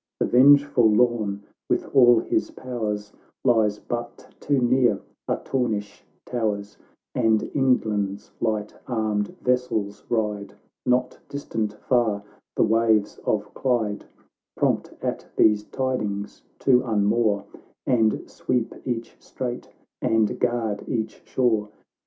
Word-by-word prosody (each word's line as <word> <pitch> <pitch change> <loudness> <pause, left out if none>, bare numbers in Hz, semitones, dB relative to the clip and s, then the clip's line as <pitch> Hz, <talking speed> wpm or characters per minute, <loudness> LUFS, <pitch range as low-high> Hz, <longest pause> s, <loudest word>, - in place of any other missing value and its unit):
The - - +2
vengeful 140 -2 +6
Lorn, 105 -3 +2 0.3
with - - +1
all 120 -3 +7
his - - -1
powers, 105 -5 -4 0.3
Lies 110 -4 +3
but 120 +1 -6
too 140 -2 +1
near 125 0 +3 0.3
Artornish 105 -6 -2 0.2
towers, 105 -4 -2 0.3
And 110 -1 +2
England's 105 -7 0
light 110 -2 -1
armed 110 -4 -1
vessels 125 -5 -1
ride, 105 -3 -1 0.3
Not 125 0 +1
distant 110 -7 -3
far, 110 -3 +1 0.3
the - - +3
waves 110 -2 +2
of 105 -1 -1
Clyde, 115 -6 -1 0.5
Prompt - - +1
at - - -3
these 105 -1 +4
tidings 105 -7 -3 0.2
to 125 -2 +5
unmoor, 105 -2 +1 0.4
And 110 -3 +2
sweep 120 -2 -2
each 120 -2 -4
strait, 125 -2 -5 0.3
and 110 -2 +1
guard 115 -4 0
each 110 -2 -3
shore. 110 -5 +1
110 Hz, 110 wpm, -24 LUFS, 105-125 Hz, 0.5 s, all